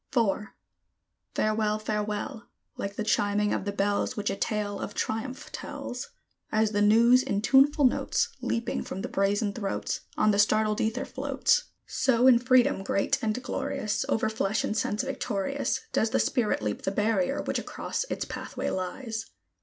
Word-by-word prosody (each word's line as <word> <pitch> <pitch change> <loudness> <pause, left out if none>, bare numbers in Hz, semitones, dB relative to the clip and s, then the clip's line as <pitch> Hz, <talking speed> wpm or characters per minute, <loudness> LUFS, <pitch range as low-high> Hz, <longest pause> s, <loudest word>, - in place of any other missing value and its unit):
IV. 210 -2 +2 0.9
Farewell! 215 0 +1
Farewell! 215 +1 -3 0.3
Like 200 0 -4
the 215 - -2
chiming 210 -1 +1
of - - -2
the 200 - -1
bells, 200 +1 0
Which 205 0 -1
a - - -2
tale 205 -1 -2
of 205 - -5
triumph 250 +4 -3
tells; 250 0 -6 0.4
As 215 0 +2
the 205 -1 +1
news 230 +4 +6
in 200 -4 -2
tuneful 275 +3 +5
notes, 255 - +1
Leaping 230 0 -1
from 190 - -6
the - - -2
brazen 200 +1 +1
throats, 200 -3 -2 0.2
On 215 - +4
the 200 - +1
startled 215 0 +3
ether 225 +4 -1
floats; - - +1 0.2
So 255 -2 +2
in 250 -2 +7
freedom, 250 -5 +3
great 195 +6 0
and 220 0 0
glorious, 215 -3 -2
Over 220 - +1
flesh 220 -1 0
and 215 - -1
sense 210 +2 0
victorious, 270 -1 -2
Does 220 - +2
the - - +1
Spirit 230 - +1
leap 105 -1 -2
the - - -1
barrier 205 -1 0
which - - -1
across - - -3
its - - -3
pathway - - -4
lies! 220 +4 -4
215 Hz, 160 wpm, -28 LUFS, 205-235 Hz, 0.9 s, in